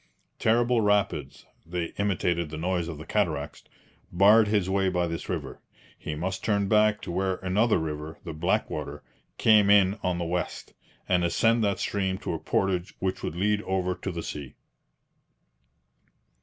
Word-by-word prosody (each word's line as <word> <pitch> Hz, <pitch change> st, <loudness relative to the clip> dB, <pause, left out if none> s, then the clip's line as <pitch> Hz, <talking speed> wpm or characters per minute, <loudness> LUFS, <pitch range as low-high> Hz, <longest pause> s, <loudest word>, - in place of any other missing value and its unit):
Terrible 120 Hz, +1 st, +3 dB
rapids 105 Hz, -1 st, 0 dB, 0.2 s
(they 85 Hz, 0 st, -4 dB
imitated 90 Hz, -5 st, 0 dB
the 80 Hz, -, -6 dB
noise 85 Hz, 0 st, -1 dB
of 85 Hz, -3 st, -6 dB
the 80 Hz, -, -9 dB
cataracts) 80 Hz, -8 st, -2 dB, 0.5 s
barred 105 Hz, +4 st, +6 dB
his 105 Hz, -3 st, +1 dB
way 95 Hz, 0 st, +1 dB
by 90 Hz, -1 st, 0 dB
this 85 Hz, 0 st, -5 dB
river. -, -, -4 dB, 0.3 s
He 75 Hz, -, -6 dB
must 95 Hz, +5 st, -4 dB
turn 100 Hz, -2 st, +1 dB
back 105 Hz, +1 st, +3 dB
to -, -, -6 dB
where 95 Hz, +1 st, 0 dB
another 105 Hz, +5 st, +2 dB
river 80 Hz, 0 st, -5 dB
(the 80 Hz, -, -6 dB
Blackwater) 75 Hz, -3 st, -2 dB, 0.3 s
came 105 Hz, -2 st, +5 dB
in 100 Hz, 0 st, +5 dB
on 90 Hz, -1 st, -1 dB
the 85 Hz, -, -2 dB
west, 90 Hz, +1 st, -4 dB, 0.3 s
and 90 Hz, -1 st, +2 dB
ascend 115 Hz, +6 st, +2 dB
that 100 Hz, -1 st, 0 dB
stream 95 Hz, -2 st, -1 dB
to -, -, -4 dB
a -, -, -3 dB
portage 95 Hz, -2 st, -1 dB
which 95 Hz, 0 st, -2 dB
would -, -, -4 dB
lead 105 Hz, +3 st, +1 dB
over 95 Hz, -2 st, -1 dB
to 95 Hz, -, -5 dB
the 85 Hz, -1 st, -5 dB
sea. 70 Hz, -3 st, -7 dB
95 Hz, 160 wpm, -27 LUFS, 85-105 Hz, 0.5 s, barred